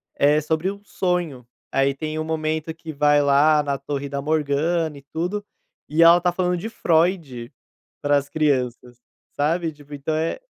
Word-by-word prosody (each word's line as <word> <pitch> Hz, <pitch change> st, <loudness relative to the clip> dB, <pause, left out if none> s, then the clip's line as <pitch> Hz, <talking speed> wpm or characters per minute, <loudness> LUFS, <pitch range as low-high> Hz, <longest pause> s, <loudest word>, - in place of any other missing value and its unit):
é 150 Hz, +2 st, +3 dB
sobre 160 Hz, +4 st, -1 dB
um 200 Hz, 0 st, -12 dB
sonho. 175 Hz, -, -2 dB, 0.2 s
Aí 135 Hz, 0 st, +2 dB
tem 155 Hz, +2 st, -5 dB
um -, -, -1 dB
momento 160 Hz, 0 st, -2 dB
que 160 Hz, 0 st, -9 dB
vai 145 Hz, 0 st, +4 dB
lá 145 Hz, +2 st, +4 dB
na 140 Hz, -1 st, -1 dB
torre 140 Hz, +1 st, -4 dB
da 140 Hz, 0 st, -3 dB
Morgana 155 Hz, +1 st, 0 dB
e -, -, -12 dB
tudo, 180 Hz, +6 st, -2 dB, 0.4 s
e 160 Hz, +3 st, +4 dB
ela 170 Hz, +1 st, +8 dB
está 175 Hz, 0 st, +1 dB
falando 180 Hz, 0 st, 0 dB
de 215 Hz, +6 st, -5 dB
Freud, 160 Hz, -, 0 dB, 0.5 s
para 145 Hz, 0 st, +3 dB
as 140 Hz, 0 st, -1 dB
crianças, 125 Hz, -5 st, -1 dB, 0.3 s
sabe. 160 Hz, +3 st, 0 dB
Tipo 145 Hz, -1 st, -13 dB
então 145 Hz, +2 st, -3 dB
é 160 Hz, -, -1 dB
155 Hz, 170 wpm, -22 LUFS, 140-165 Hz, 0.5 s, ela